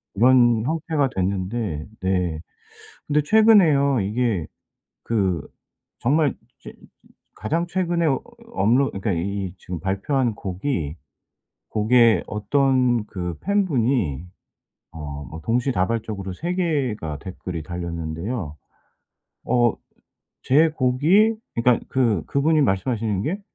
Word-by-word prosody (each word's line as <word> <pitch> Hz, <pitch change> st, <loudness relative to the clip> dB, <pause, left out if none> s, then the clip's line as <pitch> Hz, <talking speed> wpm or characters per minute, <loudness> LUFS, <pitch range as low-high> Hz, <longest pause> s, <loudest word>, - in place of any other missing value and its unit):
이런 120 Hz, 0 st, +5 dB
형태가 155 Hz, -2 st, 0 dB
됐는데 95 Hz, -3 st, -2 dB, 0.2 s
네 90 Hz, -4 st, -1 dB, 0.7 s
근데 150 Hz, 0 st, +2 dB
최근에요 160 Hz, -, +5 dB
이게 105 Hz, -3 st, -1 dB, 0.6 s
그 95 Hz, -9 st, 0 dB, 0.5 s
정말 145 Hz, +3 st, +2 dB, 0.3 s
제 -, -, -10 dB, 0.6 s
가장 165 Hz, +11 st, -2 dB
최근에 175 Hz, -2 st, 0 dB, 0.5 s
업로 130 Hz, -, +3 dB
그러니까 100 Hz, +1 st, -2 dB
이 95 Hz, +2 st, -3 dB
지금 90 Hz, -2 st, -7 dB
발표한 110 Hz, +5 st, 0 dB
곡이 90 Hz, -, -3 dB, 0.7 s
곡에 115 Hz, +1 st, +4 dB
어떤 125 Hz, +1 st, +1 dB
그 90 Hz, -4 st, -5 dB
팬 200 Hz, 0 st, +1 dB
분이 115 Hz, -, 0 dB, 0.7 s
어 75 Hz, -3 st, -7 dB
뭐 80 Hz, 0 st, -8 dB
동시다발적으로 110 Hz, -, -1 dB
3 170 Hz, -, -3 dB
개가 130 Hz, -, -1 dB
댓글이 90 Hz, -1 st, -6 dB
달렸는데요. 85 Hz, +1 st, -5 dB, 0.9 s
어 120 Hz, -2 st, +3 dB, 0.7 s
제 155 Hz, +5 st, +4 dB
곡이 155 Hz, -, +3 dB, 0.2 s
그니까 120 Hz, 0 st, +3 dB
그 115 Hz, -10 st, +1 dB
그분이 150 Hz, +2 st, +2 dB, 0.4 s
말씀하시는 105 Hz, -4 st, -1 dB
게 195 Hz, -, -2 dB
115 Hz, 215 characters per minute, -23 LUFS, 95-140 Hz, 0.9 s, 이런